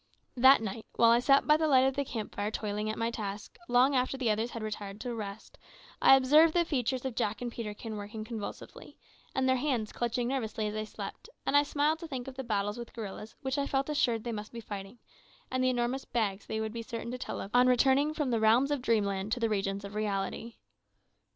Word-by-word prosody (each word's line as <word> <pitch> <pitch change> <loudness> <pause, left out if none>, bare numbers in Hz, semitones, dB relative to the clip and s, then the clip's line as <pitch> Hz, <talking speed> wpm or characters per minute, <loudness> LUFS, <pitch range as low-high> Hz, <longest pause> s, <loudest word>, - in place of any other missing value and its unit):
That 260 -1 +6
night, 220 +1 -5
while 230 0 +6
I 235 - +5
sat 275 +2 +4
by 300 0 +5
the 315 0 +1
light 260 -3 +5
of 265 0 +1
the 280 - 0
camp 225 -5 -5
fire 205 +1 -2
toiling 210 -1 -3
at 215 - -3
my 230 +1 -1
task, 205 -2 -6
long 255 +3 +4
after 255 +1 +1
the 245 -4 +1
others 220 +3 -1
had 230 -2 -6
retired 205 -1 -5
to 245 -2 -3
rest, 210 -2 -7 0.4
I 270 - +8
observed 300 +5 +5
the 345 -1 +3
features 260 -4 -1
of 260 - -2
Jack 220 -2 -1
and 245 -1 -4
Peterkin 220 -1 -6
working 210 +1 -6
convulsively, 220 -2 -8 0.4
and 265 0 +1
their 260 0 +3
hands 245 -6 -1
clutching 240 0 -1
nervously 225 -5 -2
as 210 - -2
they 215 0 -3
slept, 215 - -8 0.2
and - - +1
I 285 - +8
smiled 295 +2 +1
to 335 - -7
think 260 -4 -5
of 270 - -6
the 265 +1 -6
battles 205 -1 -1
with 235 - -8
gorillas 215 -1 -7
which 265 +1 -1
I 280 - 0
felt 270 +1 0
assured 240 -7 +1
they 240 - -3
must 210 -1 -6
be 235 - -6
fighting, 205 0 -7 0.5
and 255 0 0
the 255 - +4
enormous 250 +2 -1
"bags" 205 -4 -2
they 220 - -2
would 220 0 -3
be 230 - -4
certain 230 +1 -6
to 250 - -5
tell - - -5
of 195 - -6
on 250 +1 +5
returning 270 +4 +3
from 295 -5 -1
the 230 - +2
realms 230 +6 +4
of 290 -3 0
dreamland 205 -4 0
to 245 - -2
the 230 -1 +1
regions 195 -1 -1
of 200 - -8
reality. 210 +2 -3
235 Hz, 235 wpm, -30 LUFS, 215-265 Hz, 0.5 s, I